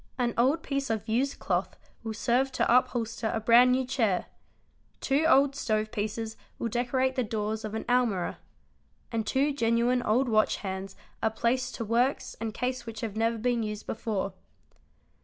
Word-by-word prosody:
An 240 -2 0
old 275 +7 +2
piece 275 -1 -2
_ - - -10
of 220 -1 -2
used 255 +5 0
cloth - - -2 0.2
will 225 -1 -5
serve 250 +5 +1
to 235 - +3
upholster 240 -3 +1
a - - 0
brand 240 +3 +6
new 260 +1 +2
chair: 225 -8 0 0.7
two 280 +4 +1
old 275 -1 +5
stove 215 -4 -1
pieces 220 0 -3 0.2
will 230 - -2
decorate 255 +3 0
the 255 - +1
doors 215 0 -3
of 215 0 -4
an 220 - -3
almirah; 240 -7 +1 0.7
and 225 -2 -2
two 280 +2 +2
genuine 235 -1 +2
old 245 +4 +2
watch 215 -2 +3
_ - - -12
hands 190 0 -5 0.3
are 220 - +2
placed 235 +3 -1
to 230 - -4
works 240 +5 0
and 225 -2 -3
case 250 0 -2
which 225 -1 -6
have 220 -3 -4
never 225 +1 +1
been 240 +1 0
used 210 -1 -4
before. 200 -4 -3
230 Hz, 175 wpm, -28 LUFS, 220-255 Hz, 0.7 s, brand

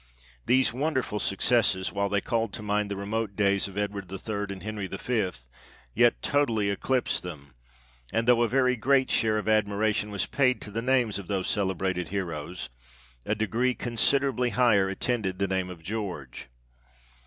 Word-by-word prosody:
These 130 -1 +4
wonderful 130 -5 -1
successes, 95 -2 +2
while 100 0 0
they 100 0 +1
called 115 -3 -1
to 110 - -6
mind 105 0 0
the 100 - -3
remote 100 +1 -3
days 100 -1 +2
of 100 0 -10
Edward 100 -2 -3
the 95 +2 -6
Third 105 0 -4
and 95 -2 -7
Henry 105 -2 -4
the - - -6
Fifth, 95 - -2 0.5
yet - - +3
totally 115 -8 +1
eclipsed 125 +5 0
them; 70 -7 -9 0.6
and 115 +1 0
though 120 -1 +5
a 120 - +3
very 125 0 +3
great 130 +2 +2
share 110 -1 +2
of 105 - -3
admiration 105 0 +1
was 100 -3 -1
paid 130 -2 +2
to 105 - -7
the 115 +3 -2
names 125 -4 +1
of 95 - -9
those 95 -2 -1
celebrated 95 -3 -1
heroes, 90 -4 -4 0.6
a 105 - +1
degree 115 +4 0
con 120 -1 -5
siderably 135 0 +2
higher 105 -6 +4
attended 95 -2 -1
the 100 +1 0
name 95 -1 -1
of 85 -3 -10
George. 90 - -5
105 Hz, 175 wpm, -27 LUFS, 95-120 Hz, 0.6 s, though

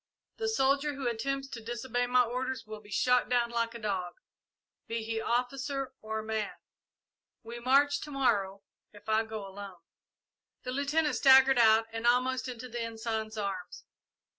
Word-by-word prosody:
The 450 - -2
soldier 280 -5 +1
who 270 -2 -3
attempts 270 +4 -2
to 235 - -7
disobey 240 +1 -2
my 250 0 +5
orders 250 0 -3
will 215 0 -8
be 205 - -17
shot 250 +4 +2
down 240 -1 +2
like 230 0 -1
a - - -4
dog, 190 -5 -3 0.7
be 230 0 -3
he 225 0 -2
officer 265 +3 -2
or 220 0 -4
man. 220 -1 -3 0.9
We 235 +1 -7
march 280 +4 +3
to 300 - -7
morrow, 205 -8 0 0.3
if 205 0 -17
I 220 +1 +3
go 220 -2 -6
alone!" 195 -2 -10 0.8
The 255 - -4
Lieutenant 285 +2 +1
staggered 265 -1 +7
out 225 -1 +6
and 225 +1 -2
almost 255 +2 +2
into 250 0 -6
the 240 -1 -5
Ensign's 220 -1 -4
arms. 195 -3 -5
235 Hz, 160 wpm, -30 LUFS, 220-260 Hz, 0.9 s, staggered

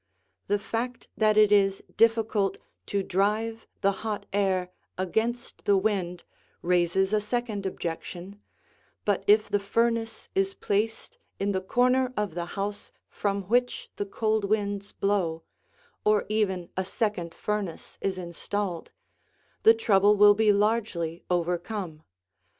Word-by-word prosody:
The 205 - +2
fact 230 +4 -4
that 215 -1 +3
it 210 -1 +6
is 195 -1 +3
difficult 220 -2 +2 0.3
to 200 -1 0
drive 215 +5 0
the 200 - +4
hot 215 -2 -3
air 190 -3 +1 0.3
against 225 +6 -2
the 200 -1 +4
wind 190 -4 -1 0.4
raises 180 +3 +2
a 210 - +3
second 215 -3 -2
objection, 180 +3 -6 0.6
but 200 -2 +1
if 210 +1 +5
the 205 - +1
furnace 230 +2 -1
is 390 0 0
placed 215 +2 -2 0.2
in 200 +1 0
the 190 -1 -1
corner 250 +5 +2
of 210 -5 -1
the 170 0 -3
house 205 +1 -4 0.2
from 200 -1 -1
which 245 +6 0
the 205 - -2
cold 215 +1 0
winds 205 -1 -1
blow, 180 -5 0 0.6
or 210 -1 +3
even 190 -5 0
a 190 - 0
second 185 -4 -2
furnace 210 -5 -4
is 190 -1 -1
installed, 180 +1 -4 0.7
the 225 - +7
trouble 205 -2 +4
will 205 0 +8
be 215 0 +4
largely 200 -6 0
overcome. 175 -1 -2
205 Hz, 130 wpm, -27 LUFS, 190-220 Hz, 0.7 s, will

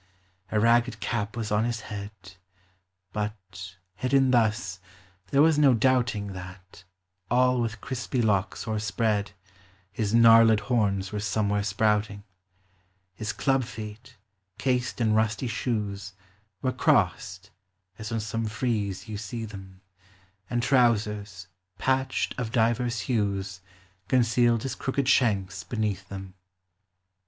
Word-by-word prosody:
A 105 - +2
ragged 115 0 +3
cap 105 +1 -3
was 110 -2 -3
on 105 +1 +2
his 120 -1 -2
head; 105 -2 -6 1.0
But 95 -3 -6
— 95 - -51
hidden 130 +5 +2
thus 110 -5 +1 0.3
— 90 0 -32
there 140 +1 +4
was 160 -2 +4
no 140 -4 +6
doubting 115 -4 +1
That, 95 0 -11 0.4
all 125 0 +3
with 110 -2 -3
crispy 125 -1 -3
locks 105 -4 0
o'erspread, 105 -1 -1 0.6
His 105 0 -2
gnarled 115 -1 +7
horns 100 -6 0
were 105 - -3
somewhere 105 0 0
sprouting; 105 0 0 0.9
His 110 +1 -4
club 135 -1 +1
feet, 110 +3 -9 0.4
cased 125 -1 -1
in 110 -2 +2
rusty 110 +2 +1
shoes, 105 -5 -3 0.5
Were 130 - +1
crossed, 95 -5 +1 0.5
as 110 +1 -6
on 115 -1 -1
some 110 +1 -3
frieze 105 -4 -2
you 105 -2 -5
see 115 +1 -5
them, 95 -3 -11 0.7
And 120 0 -1
trousers, 105 -7 +1 0.3
patched 130 +2 0
of 115 -3 -3
divers 120 0 +1
hues, 100 -5 -2 0.5
Concealed 120 -1 +3
his 135 - -3
crooked 135 0 -2
shanks 100 -7 +2
beneath 105 -5 -3
them. 95 -1 -8
110 Hz, 125 wpm, -27 LUFS, 100-120 Hz, 1.0 s, gnarled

